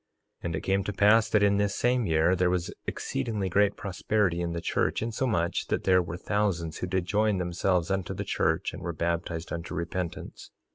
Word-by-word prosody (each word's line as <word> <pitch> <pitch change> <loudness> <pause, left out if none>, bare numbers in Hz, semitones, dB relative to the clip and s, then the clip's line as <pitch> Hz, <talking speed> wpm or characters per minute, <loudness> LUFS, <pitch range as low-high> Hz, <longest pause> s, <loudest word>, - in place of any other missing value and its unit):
3:24 - - -11
And 85 -1 -1
it - - -3
came 95 0 +1
to 105 - -2
pass 110 +3 +5
that 105 -2 +3
in 100 0 +4
this 100 -1 +1
same 125 -1 +1
year 80 +3 +3
there 90 0 +2
was 90 -1 -1
exceedingly 100 +5 -2
great 100 +2 +2
prosperity 100 -1 0
in 85 -1 -2
the 85 - -3
church, 85 - 0
insomuch 110 -7 -1
that - - -1
there 90 -1 +4
were 85 0 -5
thousands 90 -5 -1
who 90 - -2
did 95 -1 -1
join 105 +1 +2
themselves 90 0 0
unto 95 -2 -2
the - - -3
church - - 0
and - - -8
were 85 - -3
baptized 85 0 -2
unto 85 0 -5
repentance. 85 +1 -5
90 Hz, 200 wpm, -28 LUFS, 85-105 Hz, -, pass